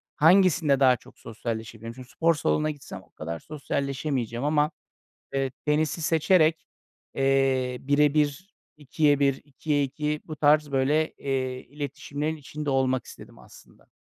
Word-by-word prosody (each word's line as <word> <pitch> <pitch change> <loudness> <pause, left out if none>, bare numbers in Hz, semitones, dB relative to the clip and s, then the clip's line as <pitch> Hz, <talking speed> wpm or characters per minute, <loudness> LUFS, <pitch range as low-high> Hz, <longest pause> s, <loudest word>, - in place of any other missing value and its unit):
hangisinde 165 -3 +4
daha 130 -2 +6
çok - - -19
sosyalleşebilirim? 115 0 -6
Çünkü 130 0 -12
spor 165 0 +2
salonuna 155 +1 0
gitsem 145 -2 -10
o - - -26
kadar 80 +1 -6
sosyalleşemeyeceğim 140 -4 -3
ama, 150 +1 +2 0.6
eee, 135 -1 0 0.2
tenisi 155 +2 +1
seçerek, 160 0 +3 0.5
eee, 135 -2 +1
1'e 145 +1 +3
1, 150 +6 0 0.2
2'ye 145 0 +1
1, 140 -1 +2
2'ye 145 +1 -1
2 150 +2 -3
bu 155 - -7
tarz 150 0 +3
böyle, 145 +4 +2
eee, 130 -2 -3
iletişimlerin 145 +2 -4
içinde 150 0 -5
olmak 130 -1 +1
istedim - - -13
aslında. - - -18
145 Hz, 135 wpm, -26 LUFS, 130-155 Hz, 0.6 s, daha